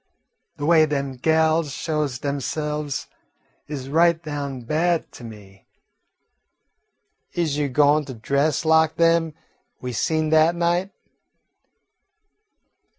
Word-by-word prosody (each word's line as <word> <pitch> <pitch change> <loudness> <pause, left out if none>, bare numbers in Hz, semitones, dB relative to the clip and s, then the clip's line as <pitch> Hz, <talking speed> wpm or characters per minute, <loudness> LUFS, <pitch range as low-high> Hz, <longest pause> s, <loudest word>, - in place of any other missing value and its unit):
De 145 - -4
way 160 -1 +5
dem 140 -2 -2
gals 160 +2 +1
shows 150 -2 -2
demse'ves 145 +1 -3 0.6
is 140 -3 -6
right 165 +3 +2
down 140 -3 -5
bad 160 +7 0
to 130 - -13
me. 100 -4 -13 1.7
Is 155 -4 -1
you 145 -1 0
goin' 145 +2 +3
to 130 -2 -8
dress 140 +7 0
lak 160 0 +3
dem 165 -2 +2 0.4
we 125 -1 -5
seen 155 +5 0
dat 160 +2 +4
night?" 175 +2 0
150 Hz, 105 wpm, -22 LUFS, 140-160 Hz, 1.7 s, way